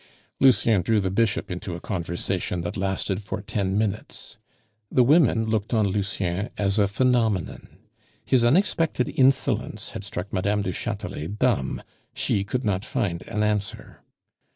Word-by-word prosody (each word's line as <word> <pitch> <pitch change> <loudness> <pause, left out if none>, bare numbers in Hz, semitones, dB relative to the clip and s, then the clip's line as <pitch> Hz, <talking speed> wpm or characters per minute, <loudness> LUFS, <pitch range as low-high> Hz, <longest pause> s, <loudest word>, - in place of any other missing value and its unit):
Lucien 115 -6 +4
drew 110 +4 +2
the 95 -2 -1
Bishop 105 -2 0
into 90 0 -4
a - - -6
conversation 85 -1 -2
that 85 - -4
lasted 95 0 -1
for 100 - -5
ten 100 -1 -2
minutes. 105 -1 -3 0.5
The 125 - +5
women 130 -5 +4
looked 110 +1 -1
on 110 -2 +3
Lucien 100 0 -2
as 100 +1 +1
a 100 - +4
phenomenon. 110 -4 0 0.6
His 125 -3 +3
unexpected 160 -1 +2
insolence 130 -3 +1
had - - -7
struck 95 -1 -6
Mme. 100 +2 +1
du 95 - -2
Chatelet 80 +5 -4
dumb; 110 - 0 0.3
she 100 - 0
could 125 +5 -3
not 95 -2 0
find 85 -6 -2
an 105 0 -1
answer. 105 -2 -3
105 Hz, 145 wpm, -25 LUFS, 95-115 Hz, 0.6 s, The